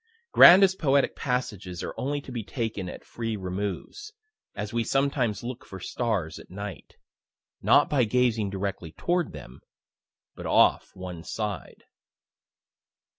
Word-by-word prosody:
Grandest 190 +1 +8
poetic 140 -2 +2
passages 105 -9 -3
are - - -4
only 145 +2 -2
to 135 - -11
be 120 -3 -4
taken 110 -5 -4
at - - -10
free 115 -2 -4
removes, 100 - -5 0.4
as 105 +1 -5
we 120 0 +1
sometimes 135 -6 0
look 125 +1 -6
for 95 - -10
stars 105 -5 -2
at - - -14
night, 100 +1 -8 0.7
not - - +5
by 135 -4 +2
gazing 115 -2 +1
directly 95 -4 -4
toward 175 0 0
them, 65 -4 -11 0.7
but - - -7
off - - +4
one 90 -3 -7
side. 105 0 -5
110 Hz, 130 wpm, -27 LUFS, 95-130 Hz, 0.7 s, Grandest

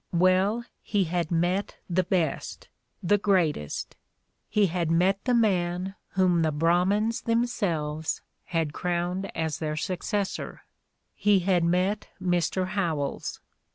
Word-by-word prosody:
Well, 185 +6 +3 0.2
he 205 -2 +1
had 170 -1 -1
met 175 +4 0
the 180 +1 +2
best, 175 -4 -2 0.3
the 205 +4 +3
great 185 -6 +3
est, 75 -1 -6 0.5
he 210 -1 +3
had 170 -2 -1
met 185 +4 +2
the 250 -1 +3
man 185 -4 +1 0.2
whom 185 -3 +3
the 160 -1 +2
Brahmins 180 +8 +2
them 230 +1 +2
selves 160 -9 -2 0.2
had 165 -4 -1
crowned 180 +3 -2
as 160 -2 -1
their 155 -1 -2
successor, 190 +4 -3 0.5
he 205 -2 +3
had 180 -1 +2
met 185 +5 +1
Mr. 185 0 0
Howells. 165 -8 -2
180 Hz, 125 wpm, -27 LUFS, 165-195 Hz, 0.5 s, Well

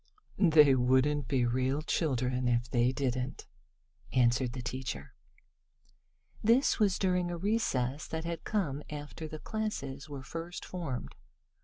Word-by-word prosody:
"They 150 -3 +7
wouldn't 130 +3 +2
be 130 -3 +2
real 130 +4 0
children 130 -5 0
if 120 0 +1
they 120 0 +2
didn't," 130 0 -2 0.7
answered 120 0 +2
the 125 -2 -5
teacher. 120 - -5 1.3
This 235 +6 +4
was 200 -4 +3
during 180 -2 +1
a 175 - -3
recess 155 - 0
that 160 0 -4
had 170 -1 -4
come 150 -10 -1
after 150 +2 -6
the 155 - -7
classes 155 -9 -4
were 140 -2 -7
first 165 +5 -6
formed. 140 - -5
140 Hz, 130 wpm, -31 LUFS, 125-165 Hz, 1.3 s, They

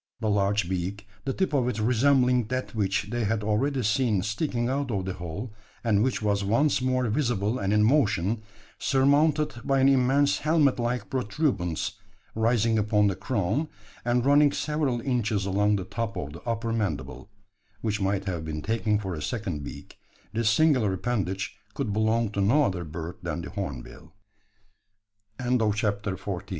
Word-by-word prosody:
The 110 -3 0
large 100 -1 +1
beak 95 +3 -3 0.2
the 135 - 0
tip 190 -1 -1
of 130 -4 +2
it 125 -4 -1
resembling 125 +1 +3
that 130 +2 -3
which 100 -1 0
they 120 -1 -1
had 105 +1 0
already 125 +6 0
seen 110 -3 +1
sticking 120 +2 -1
out 135 +1 -1
of 100 -5 -2
the 95 - -2
hole, 95 +6 -6 0.3
and 105 -4 +3
which 125 -2 0
was 100 -1 +1
once 125 +8 +2
more 130 -1 +1
visible 115 -3 0
and 100 0 -1
in 105 0 +4
motion 110 - +2 0.4
surmounted 145 +1 +2
by 135 0 +2
an 135 - +5
immense 135 +2 +3
helmet 150 -4 +2
like 120 -3 -1
protuberance, 120 - -1 0.3
rising 115 0 +2
upon 105 0 +2
the 95 - -2
crown, 120 - -1 0.4
and 120 +1 +1
running 145 +1 +5
several 150 -6 -1
inches 115 -6 0
along 100 +2 +2
the 95 -2 -3
top 115 +1 -4
of 75 -4 -5
the 80 - -10
upper 115 0 -1
mandible, 105 -2 -3 0.5
which 105 -1 -1
might 95 0 0
have 90 -4 -3
been 75 -1 -5
taken 110 -1 +1
for 95 -3 -4
a 75 - -5
second 90 -8 -3
beak - - -10 0.3
this 115 0 +2
singular 125 -5 +3
appendage 95 -2 -2 0.2
could 105 - -2
belong 110 +1 +1
to 100 - -1
no 125 +10 +4
other 90 -8 -1
bird 80 +2 -6
than - - -4
the - - -7
hornbill. 75 +6 -7 1.6
CHAPTER 100 -3 -1
FIFTEE 95 -2 -5
110 Hz, 165 wpm, -27 LUFS, 100-130 Hz, 1.6 s, an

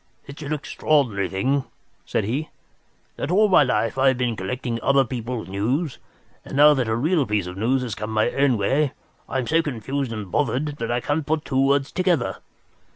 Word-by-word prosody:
"It's 140 +2 -10
an 145 0 -5
extraordinary 140 -8 0
thing," 130 +9 0 0.4
said - - 0
he, 135 +10 -2 0.7
"that - - -3
all 210 +4 +4
my 185 - +6
life 125 -2 0
I 135 - +4
have 130 -1 +3
been 125 -2 0
collecting 115 +4 -3
other 140 +1 +3
people's 120 -1 -4
news, 125 - -1 0.4
and - - -6
now 150 +1 +8
that 130 -5 0
a 110 - 0
real 155 +6 +2
piece 105 -3 0
of 90 0 -7
news 125 +6 +1
has 120 -4 -4
come 105 +2 -5
my 110 +2 +1
own 140 -3 +2
way 135 +8 +1 0.4
I - - -2
am 130 - -1
so 160 +6 +3
confused 135 -2 -3
and 105 -5 -6
bothered 145 +1 0
that 115 - -4
I 120 +1 0
can't 145 +2 -1
put 155 0 0
two 135 0 +1
words 140 0 +1
together. 180 -9 0
130 Hz, 200 wpm, -23 LUFS, 115-145 Hz, 0.7 s, now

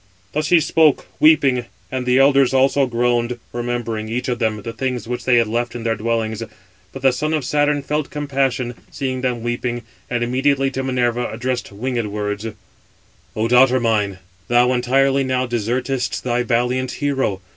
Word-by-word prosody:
Thus 155 +1 0
he 175 0 +5
spoke, 155 -1 +3
weeping; 140 -6 +4 0.3
and 130 -1 -3
the 125 +1 +4
elders 135 -1 +4
also 135 +1 +3
groaned, 120 0 0 0.2
remembering, 120 -2 -3
each 125 +3 -2
of 120 -1 -1
them, 110 -3 -1
the 115 - -5
things 125 0 -3
which 120 0 -4
they 125 - +4
had 115 -1 +4
left 120 +2 -2
in 120 - -5
their 115 -1 +1
dwellings. 115 0 -2 0.5
But 135 - -9
the 135 - +5
son 155 +5 -1
of 150 -4 -2
Saturn 145 0 +1
felt 150 +1 -2
compassion, 135 -4 -1 0.2
seeing 130 -2 -3
them 125 -3 -1
weeping, 120 0 -2 0.3
and 120 -1 0
immediately 135 +2 +1
to 135 - -3
Minerva 125 -2 0
addressed 120 +1 -3
winged 120 +2 -2
words: 105 +1 -3 0.9
"O 110 +1 0
daughter 125 +2 +5
mine, 105 -5 0 0.3
thou 120 +1 +4
entirely 135 +2 +2
now 130 -1 0
desertest 120 +3 -2
thy 120 -1 0
valiant 125 +1 0
hero. 135 -9 -1
125 Hz, 165 wpm, -20 LUFS, 120-135 Hz, 0.9 s, he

